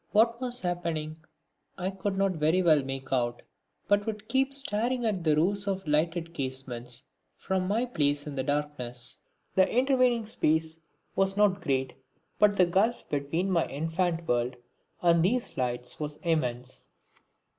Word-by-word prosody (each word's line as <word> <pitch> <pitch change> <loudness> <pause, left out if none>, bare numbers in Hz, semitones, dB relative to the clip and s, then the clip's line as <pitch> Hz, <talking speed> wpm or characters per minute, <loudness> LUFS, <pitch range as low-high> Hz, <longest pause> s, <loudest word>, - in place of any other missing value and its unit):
What 230 +3 +4
was 250 -1 -3
happening 165 -3 -2 0.6
I 185 +1 -2
could 195 0 -3
not 195 0 +2
very 165 +2 +2
well 155 -4 +5
make 135 0 -5
out, 120 -2 0 0.4
but 205 +1 +2
would 215 -1 -4
keep 270 +1 +2
staring 245 -2 -1
at 200 -6 0
the 155 -2 +4
rows 200 +6 +1
of 190 -3 -2
lighted 165 +2 0
casements 130 -3 -4 0.3
from 190 -1 -1
my 220 +5 +1
place 145 -10 0
in 150 - -5
the 135 - -1
darkness. 130 -4 -3 0.3
The 190 - +4
intervening 250 -2 +3
space 160 -5 0 0.4
was 195 0 +1
not 200 -2 +3
great 130 -4 0 0.5
but 205 -1 +5
the 180 - +6
gulf 195 +7 +1
between 150 +6 -1
my 170 -3 +2
infant 165 +3 -1
world 120 +1 +1 0.5
and 170 -1 +5
these 235 +7 0
lights 125 -1 -2
was 150 -1 -4
immense. 130 -7 -1
170 Hz, 150 wpm, -28 LUFS, 145-205 Hz, 0.6 s, the